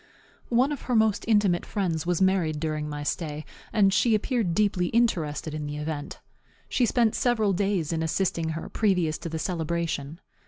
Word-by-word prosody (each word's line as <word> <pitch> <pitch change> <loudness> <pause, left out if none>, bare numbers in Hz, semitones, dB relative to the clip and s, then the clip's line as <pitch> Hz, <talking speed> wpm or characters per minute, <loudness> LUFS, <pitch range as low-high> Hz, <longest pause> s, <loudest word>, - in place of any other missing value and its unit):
One 250 +4 +3
of 290 - -4
her 245 - +2
most 220 -2 +2
intimate 205 -6 +3
friends 170 -5 -2
was 175 +1 +2
married 175 -5 +1
during 155 -1 -2
my 145 0 -5
stay, 150 -1 -3 0.3
and 195 -3 +4
she 225 +2 +3
appeared 215 -5 0
deeply 200 -4 +2
interested 165 -10 0
in 150 -1 -4
the 145 0 -5
event. 150 -1 -5 0.5
She 245 - +1
spent 230 -1 +2
several 220 -5 +2
days 190 -4 0
in 160 - -1
assisting 165 0 0
her - - -6
previous 180 -7 +1
to 170 - -5
the 160 - -3
celebration. 165 -2 -2
175 Hz, 170 wpm, -26 LUFS, 155-210 Hz, 0.5 s, and